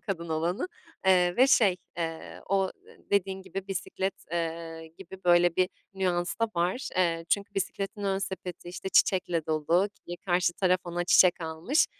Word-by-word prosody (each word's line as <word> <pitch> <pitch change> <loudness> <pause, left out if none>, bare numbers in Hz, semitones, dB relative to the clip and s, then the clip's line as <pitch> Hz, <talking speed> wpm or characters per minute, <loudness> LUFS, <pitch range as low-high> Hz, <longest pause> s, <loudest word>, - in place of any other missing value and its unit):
kadın 170 -5 -4
olanı, 165 - -1 0.4
eee, 180 -1 +4
ve, 260 +2 +6
şey, 200 -8 +4 0.2
eee, 165 -1 -5
o, 195 -1 +2 0.2
eee, - - -18
dediğin 190 -1 +1
gibi 195 0 -6
bisiklet, 190 0 -2 0.2
eee, 165 -1 -3
gibi, 190 +2 -11
böyle, 175 -1 +4
bir 185 0 +3 0.3
nüans 180 -2 0
da 230 - +2
var. 180 +10 0
Eee, 165 -2 +1
çünkü 200 0 0
bisikletin 200 +2 -3
ön 195 0 +1
sepeti, 185 -2 -6
işte, 180 +2 -5
çiçekle 180 -4 +2
dolu, 165 +5 +2 0.2
yine 175 - -5
karşı 175 -1 +2
taraf 185 0 +2
ona 175 0 -2
çiçek 180 0 +5
almış. 160 - +1
180 Hz, 160 wpm, -28 LUFS, 170-195 Hz, 0.4 s, ve